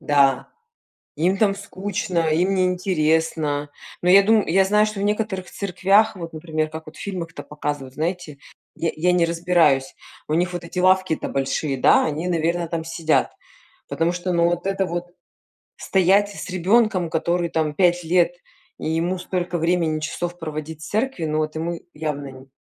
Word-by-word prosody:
Да, 140 -2 +2 0.7
им 180 +5 +2
там 200 -3 +3
скучно, 190 -4 -2
им 180 +5 +2
не 185 -1 +2
интересно, 160 -5 0 0.3
но 180 - +3
я 200 +1 +8
дум 215 +1 +4
я 190 +4 +4
знаю, 210 +2 +3
что 215 -2 -5
в - - -2
некоторых 210 -3 -1
церквях, 200 +3 +2
вот, 165 -2 -7
например, 155 -1 -2
как 160 0 -9
вот 155 - -12
в - - -12
фильмах 175 -4 -5
там - - -9
показывают, 145 -3 -5
знаете, 160 -3 -3 0.4
я 165 - -1
я 180 +3 +2
не 175 -1 +3
разбираюсь, 170 -5 +2 0.3
у 155 - 0
них 180 +2 +1
вот 175 -1 -5
эти 175 +2 -7
лавки-то 185 -2 +2
большие, 135 0 -1
да, - - +5
они, 160 +4 -2
наверно, 170 0 0
там 165 -1 -3
сидят, 165 -1 0 0.6
потому 165 +2 0
что, 180 +1 -3
ну, 170 0 +3
вот 175 +2 -3
это 195 0 0
вот 175 0 -4 0.7
стоять 195 +2 +3
с 200 - -7
ребенком, 185 0 +2
который 170 +2 0
там 155 -2 0
5 175 +1 +2
лет, 175 +1 +2 0.4
и - - -4
ему 170 +3 0
столько 180 -1 -3
времени 165 -2 +1
часов 175 +3 -4
проводить 155 0 -6
в - - -7
церкви, 220 -5 -1
ну, 155 0 -1
вот 155 0 -1
ему 165 +1 -3
явно 145 -3 -4
нь 130 +1 -15
170 Hz, 175 wpm, -22 LUFS, 155-185 Hz, 0.7 s, я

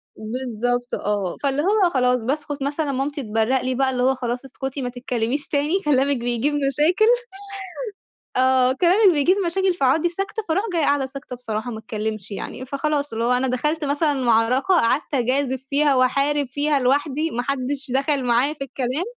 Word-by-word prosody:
بالضبط 245 +1 -3
آه، 200 -4 -2
فاللي 280 +1 +1
هو 390 +1 +3
خلاص 250 -4 +1
باسكُت 290 +2 -3
مثلًا 285 +1 -1
مامتي 275 +1 -2
تبرّق 225 +4 +1
لي 255 +1 -1
بقى، 265 +1 +2
اللي 250 -1 -1
هو 265 +1 +3
خلاص 245 +1 -4
اسكتي، 270 +1 -5
ما 250 - -2
تتكلميش 245 +2 -2
تاني 300 +6 +1
كلامِك 280 -1 +3
بيجيب 240 +4 0
مشاكل، 295 - +2 1.3
آه، 260 0 +4
كلامِك 365 +5 +4
بيجيب 340 +7 +3
مشاكل، 375 +2 +1
فاقعُدي 305 +3 +2
ساكتة 390 +5 -4
فاروح 380 +6 +1
جاية 330 - +1
قاعدة 285 -2 +2
ساكتة 265 -1 -8
بصراحة، 240 0 -4
ما 220 - -6
اتكلمش 215 -2 -5
يعني 250 +5 -6
فخلاص 285 0 -2
اللي 230 +1 -1
هو 245 - +2
أنا 250 +1 +2
دخلت 300 +5 -1
مثلًا 290 +1 +1
معركة، 245 +1 +2
قعدت 285 0 +1
أجازف 260 +1 0
فيها 285 -1 +3
وأحارب 275 +3 +2
فيها 290 +1 +1
لوحدي، 285 +4 +1
ما 245 +1 -2
حدش 275 0 -3
دخل 275 0 +1
معايا 245 +4 +2
في 280 -3 -6
الكلام. 265 +5 -2
270 Hz, 170 wpm, -22 LUFS, 250-295 Hz, 1.3 s, آه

